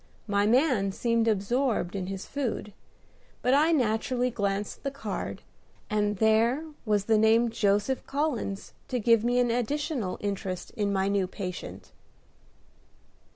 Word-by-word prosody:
My 200 -1 +1
man 240 -5 +3
seemed 230 +2 +1
absorbed 220 -1 0
in 185 -2 -3
his 195 0 -5
food; 240 -7 -3 0.7
but 250 - +3
I 305 +4 +4
naturally 245 -2 +1
glanced 200 -2 -2
at - - -31
the 275 - -1
card, 275 0 -5 0.5
and 210 -1 +1
there 225 +8 +3 0.2
was 205 -2 +2
the 220 -1 +3
name 225 +2 +4
"Joseph 210 +3 +1
Collins" 275 -9 -2
to 250 - -1
give 230 -1 +4
me 245 +1 +1
an 245 -1 +3
additional 245 - -1
interest 195 -3 -4
in 205 -2 -1
my 195 -1 +1
new 200 -2 +1
patient. 180 -1 -7
220 Hz, 140 wpm, -28 LUFS, 200-250 Hz, 0.7 s, I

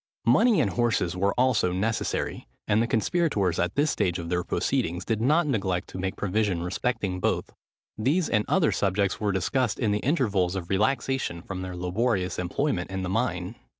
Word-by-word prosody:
Money 215 - +5
and 100 - +2
horses 115 -7 0
were 100 +2 +1
also 125 -8 +3
necessary: 105 +5 -2 0.2
and 105 +2 +3
the 115 - +1
conspirators, 115 - +1
at 90 +1 0
this 145 +1 +2
stage 90 -1 0
of 85 -1 -6
their 90 0 0
proceedings, 85 +1 -1
did 110 -1 -1
not 155 +8 +3
neglect 100 -10 -1
to - - -8
make 95 0 -2
provision 100 -3 0
respecting 95 0 -2
both. - - -1 0.5
These 150 +10 +2
and 105 -2 +2
other 175 -5 +3
subjects 100 0 0
were 105 -1 +1
discussed 110 +5 0
in 110 -4 0
the 105 - +1
intervals 105 - +1
of 90 -2 -5
relaxation 115 -3 0
from 95 -1 -5
their 90 -1 -5
laborious 90 +1 -1
employment 90 +1 -1
in 95 0 -3
the 90 - -3
mine. 95 -3 -1
100 Hz, 180 wpm, -26 LUFS, 90-125 Hz, 0.5 s, Money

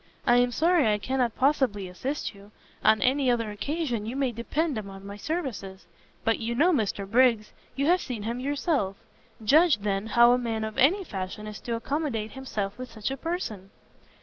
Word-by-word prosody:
I 240 -1 +5
am 245 0 +4
sorry 320 -3 +3
I 210 - +2
cannot 245 +2 -1
possibly 255 -8 +1
assist 255 +12 -4
you; 200 0 -15 0.3
on 220 -2 +4
any 265 +1 +2
other 230 -3 0
occasion 235 +1 -2
you 240 - -4
may 270 -2 0
depend 280 +7 -1
upon 195 -1 -9
my 200 0 -7
services; 210 - -4 0.4
but 225 - +1
you 235 +1 -2
know 330 +8 +4
Mr 205 -6 -1
Briggs, 230 -1 +3 0.2
you 275 - 0
have 355 +3 +4
seen 235 -6 -5
him 235 +3 -3
yourself, 275 - 0 0.5
judge, 310 +5 +5
then, 200 0 -2
how 235 +1 +6
a 250 - +3
man 225 -2 -2
of 220 0 -4
any 360 +10 +4
fashion 195 - -6
is 210 -1 -8
to 235 - -3
accommodate 235 -3 -2
himself 215 -6 -4
with 255 0 -7
such 215 +3 -4
a - - -2
person!" 250 - -4
235 Hz, 185 wpm, -27 LUFS, 210-275 Hz, 0.5 s, how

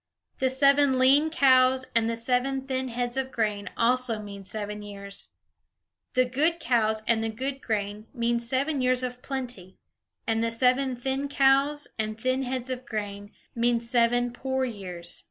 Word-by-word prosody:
The 260 - +2
seven 275 0 +4
lean 275 +4 +5
cows 260 -3 +4
and 230 0 +3
the 230 - -1
seven 255 +3 0
thin 260 -1 -2
heads 245 +1 -3
of 265 0 -1
grain 210 -3 -1
also 240 -1 +2
mean 200 -1 -8
seven 210 +1 -5
years. 200 -1 -7 0.9
The 255 0 +4
good 305 +7 +1
cows 220 -4 +1
and 225 -1 +2
the 225 - -1
good 265 +5 -4
grain 210 -1 -3
mean 235 -2 0
seven 265 +4 -1
years 255 0 +2
of 250 0 -4
plenty, 245 -10 -6 0.5
and 225 0 0
the 230 - +1
seven 255 +3 +2
thin 265 +3 -2
cows 275 +2 +3
and 215 0 -2
thin 255 +3 0
heads 260 0 -3
of 255 0 -4
grain 205 -2 -5 0.2
mean 235 0 +2
seven 240 +1 +1
poor 265 +1 -1
years. 180 -7 -5
245 Hz, 160 wpm, -27 LUFS, 220-265 Hz, 0.9 s, lean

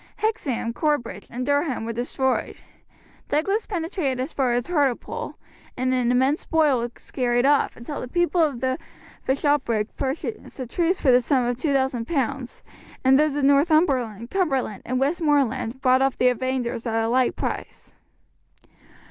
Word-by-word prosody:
Hexham, 280 - -1
Corbridge, 240 - -1
and 250 +2 -4
Durham 285 -4 0
were 230 - -3
destroyed. 255 +2 -1 0.7
Douglas 390 +9 0
penetrated 330 -8 -2
as 260 - -3
far 255 -3 +1
as 245 -1 0
Hartlepool 285 -8 -1 0.4
and 255 +1 +1
an 250 -1 +2
immense 265 +5 +2
spoil 305 -6 +2
was 235 0 -7
carried 245 -1 +1
off, 285 0 +3
until 275 +5 -6
the - - -5
people 345 +4 +1
of 285 -7 +1
the 260 0 0 0.5
bishopric 265 -6 +1
purchased 280 +7 -4
a 255 - -3
truce 345 +9 0
for 270 - +4
the 250 0 +5
sum 255 0 +1
of 245 0 -1
2000 265 -4 0
pounds, 270 -4 -2 0.4
and 265 +1 +5
those 300 -1 +2
of 290 - -1
Northumberland, 275 - +2
Cumberland, 270 - 0
and 255 +1 0
Westmoreland 275 -5 +1
bought 255 0 +4
off 270 -1 +1
the 250 - +4
invaders 250 -1 -2
at 225 - -1
a 225 0 +1
like 250 +1 +2
price. - - -5
265 Hz, 155 wpm, -24 LUFS, 245-295 Hz, 0.7 s, the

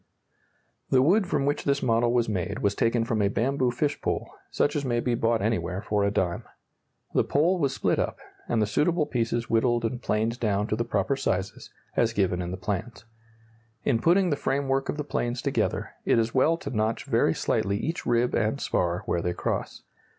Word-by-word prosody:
] - - -44
The 130 -1 +4
wood 190 +6 +3
from 140 -5 0
which 145 +1 0
this 140 0 0
model 115 0 +2
was 120 -1 +2
made 100 0 -2
was 100 - +2
taken 115 +2 +1
from 110 -2 0
a 100 - +3
bamboo 125 +5 +1
fish 145 +4 -1
pole, - - -2 0.2
such 145 - 0
as 145 - 0
may 120 -3 0
be 120 0 0
bought 115 -2 +1
anywhere 105 -4 -1
for 105 -1 0
a 100 - +3
dime. 90 -4 -1 0.7
The - - +3
pole 170 +6 +2
was 140 -4 0
split - - +1
up, - - -1 0.3
and 115 - +1
the 105 - +3
suitable 150 - +1
pieces 120 -4 -1
whittled 120 +1 +2
and 120 +2 -3
planed 115 +2 -1
down 105 -2 +1
to - - +1
the 115 - -1
proper 115 +2 0
sizes, 95 -7 -2 0.3
as 115 -1 +2
given 95 -3 +1
in 85 - -4
the 95 - -4
plans. 105 +4 -4 0.8
In 115 - +2
putting 180 +1 +3
the - - +2
framework 135 -1 -1
of - - -2
the 150 - -2
planes 120 -3 -2
together, - - -1
it - - +3
is 115 0 +1
well 155 +5 +3
to 140 - -6
notch 110 -1 -1
very - - +2
slightly 100 +1 0
each 160 +10 -3
rib 120 +1 +1
and 110 +5 0
spar 90 -7 -1
where 85 - 0
they 90 +1 -1
cross. - - -3
115 Hz, 205 wpm, -26 LUFS, 105-140 Hz, 0.8 s, The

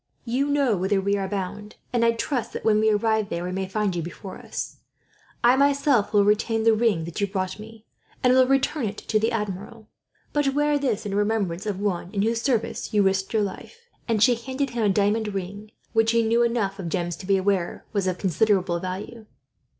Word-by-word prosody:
You 255 +4 0
know 280 -6 +2
whither 190 +2 +1
we 200 +1 +1
are 195 -1 -2
bound, 205 +2 -5 0.2
and 235 -1 +2
I 230 0 +4
trust 245 +1 -2
that, - - -6
when 215 -1 +4
we 220 0 +3
arrive 215 0 +1
there, 170 +1 -3
we 180 - -3
may 190 +1 -2
find 205 -1 -1
you 170 - -1
before 175 +3 -8
us. - - -6 0.7
I 240 +2 +6
myself 280 -5 +3
will 205 -1 +4
retain 220 +2 +2
the 225 0 +5
ring 215 -7 +1
that 170 +4 -5
you 200 - +2
brought 190 0 -3
me, 220 +1 -12 0.4
and 250 0 +5
will 255 0 +5
return 270 -1 +1
it 205 +1 -6
to 215 - 0
the 225 +2 +1
Admiral; 210 +1 -5 0.4
but 280 -2 +1
wear 295 0 +2
this, 250 -8 -1
in 200 - -3
remembrance 205 -2 0
of 200 -2 -2
one 190 -4 -2
in 200 -1 +1
whose 230 +1 0
service 235 -3 -1
you 205 - +5
risked 190 0 +1
your 220 -2 +2
life," 205 - -7 0.3
and 220 -3 +2
she 245 - +6
handed 260 +3 -3
him 240 -1 -2
a - - +3
diamond 205 +1 +1
ring, 200 +3 -5 0.2
which 225 0 +3
he 230 0 +3
knew 230 +1 +2
enough 225 -5 0
of 175 -3 -4
gems 175 -1 -2
to 185 - -10
be 195 -1 +4
aware 190 -2 -1
was 200 -3 0
of 185 -1 -1
considerable 185 -1 +1
value. 205 +5 -6
210 Hz, 215 wpm, -24 LUFS, 195-230 Hz, 0.7 s, I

